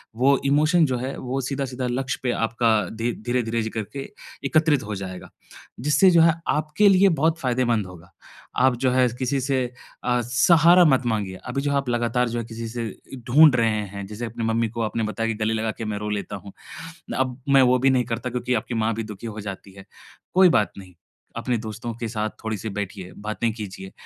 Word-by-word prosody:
वो 135 +3 +4
इमोशन 155 +4 +4
जो 125 - 0
है, 130 +3 -4
वो 130 +2 -3
सीधा-साधा 130 -1 -3
लक्ष्य 130 +1 -2
पे 125 - +1
आपका 115 +1 0 0.2
धी 115 +2 -2
धीरे-धीरे 115 -2 0
ज 110 - -3
करके 115 +5 -5 0.4
एकत्रित 155 -2 +3
हो 105 -1 -5
जाएगा, 95 -1 -7 0.6
जिससे 180 +5 +5
जो 170 -1 +6
है, 165 -1 +6
आपके 155 +7 +2
लिए 195 0 +5
बहुत 160 +1 +2
फ़ायदेमंद 120 -5 0
होगा। 90 -1 -14 0.5
आप 130 -1 +3
जो 130 - +4
है, 125 0 +4
किसी 130 +1 0
से 130 0 0 0.4
अ, 125 0 +1
सहारा 170 +8 +5
मत 130 -4 +3
माँगिए। 100 -4 -1
अभी 135 +2 -2
जो 145 - 0
आप 135 - -7
लगातार 120 0 +1
जो 120 +1 -2
है, 115 - -4
किसी 115 0 -6
से 115 -1 -4 0.3
इ - - -6
ढूँढ 150 +2 +7
रहे 115 -1 +3 0.2
हैं, 100 +1 -7
जैसे 110 +3 -6
अपने 115 0 -5
मम्मी 115 -1 +1
को 115 +1 -5
आपने 110 +1 -1
बताया 110 +1 -2
कि, 115 - -1
"गले 110 - +1
लगा 110 0 -1
के 115 - -3
मैं 105 -1 -3
रो 105 0 -4
लेता 105 0 -3
हूँ। 100 +1 -11 0.7
अब 130 -1 -1
मैं 135 -1 +6
वो - - +4
भी 135 +2 +4
नहीं 130 -1 +2
करता।" 125 +2 -3
क्योंकि 125 +1 -2
आपकी 120 - -7
माँ 115 - +1
भी 115 - -3
दुखी 105 +1 -8
हो 110 -1 -6
जाती 100 -1 -8
है, 95 -1 -13 0.5
कोई 185 -1 +7
बात 105 -9 +2
नहीं। 95 -2 -12 0.4
अपने 125 -2 -1
दोस्तों 110 +1 -6
के 115 -1 -4
साथ 110 -1 -2
थोड़ी-सी 110 0 -3
बैठिए, 100 -2 -6
बातें 110 +2 -2
कीजिए 95 -3 -8
120 Hz, 210 wpm, -23 LUFS, 110-135 Hz, 0.7 s, ढूँढ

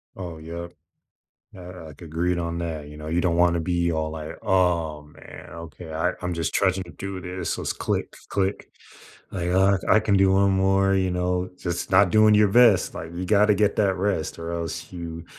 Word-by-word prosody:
Oh, 90 -4 -7
yep. 85 +2 -8 0.8
I - - -11
I 90 -2 -10
agreed 85 +2 -2
on 85 -1 -3
that, 80 -3 -5
you 75 0 -11
know? 75 0 -8
You 85 +2 0
don't 85 -2 +1
wanna 85 -1 +3
be 85 0 0
all 80 -1 -1
like, 80 -1 -7
"Oh, 85 -5 +1
man, 75 0 -13
okay, 85 0 -10
I 80 +3 0
I'm 90 0 -2
just 85 -1 -2
trying 95 -2 +3
to 95 0 -4
do 95 -1 -5
this." 90 0 -4
So - - -5
it's - - -2
click, - - -2 0.2
click. 100 0 -2 0.6
Like, 90 -2 -3
uh, 95 +1 +3
"I - - +6
can 105 -2 +1
do 95 0 +4
one 100 +1 +3
more," 95 0 +2
you 95 -1 +1
know? 90 0 -1
Just 85 0 -4
not 95 0 +5
doing 110 +1 +5
your 105 0 +5
best, 110 -3 +4
like, 80 - -7
you 90 +1 -4
gotta 105 +2 +4
get 105 0 +1
that 100 -3 +2
rest 95 -4 -2
or 85 0 -5
else 85 0 -5
you 85 -2 -7
90 Hz, 205 wpm, -24 LUFS, 85-95 Hz, 0.8 s, I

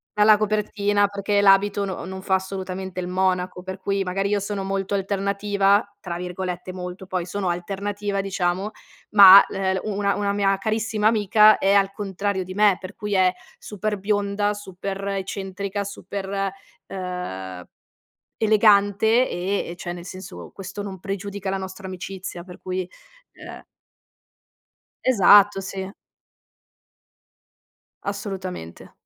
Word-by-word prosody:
dalla 210 0 +6
copertina, 205 -1 +1
perché 200 0 0
l'abito 200 0 +4
no 190 -3 -5
non 190 +1 -7
fa 190 0 +1
assolutamente 190 -1 -4
il 180 - -3
monaco. 180 0 -1
Per 190 0 -6
cui 195 0 -1
magari 195 +2 -1
io 205 0 +1
sono 200 0 -3
molto 195 0 -2
alternativa, 200 +1 +1 0.2
tra 170 -2 -5
virgolette 180 0 -5
"molto" 180 +1 -7
poi, 185 -2 -2
sono 190 0 -2
alternativa, 200 +3 -3
diciamo, 190 0 -1 0.5
ma, 195 -1 +11
l - - -7
ehm, 190 -1 0
u 215 - -3
una 200 -1 +1
una 200 -1 0
mia 200 -1 +2
carissima 220 0 0
amica 215 0 +5
è 195 +1 +2
al 195 -1 +3
contrario 195 -1 -2
di 185 +1 -8
me, 205 -1 +4
per 185 +1 -9
cui 210 -1 -3
è 185 -1 +4 0.2
super 210 0 -4
bionda, 205 0 0
super 195 -1 -6
eccentrica, 195 +1 -4
super, 200 0 -6 0.6
uhm, 95 - -6 0.7
elegante, 215 +2 +4
e 190 +3 -2
e 175 - -7
cioè, 175 0 -5
nel 175 -1 -8
senso, 185 0 -9
questo 195 +1 -7
non 195 -2 -7
pregiudica 195 0 -4
la 195 - -1
nostra 190 +1 -7
amicizia, 185 -1 -7
per 180 -1 -12
cui, 185 -1 -3 0.5
uhm - - -10 1.4
Esatto, 205 -4 +6
sì. 190 0 -5 2.1
Assolutamente. 195 - -6
195 Hz, 135 wpm, -23 LUFS, 185-205 Hz, 2.1 s, ma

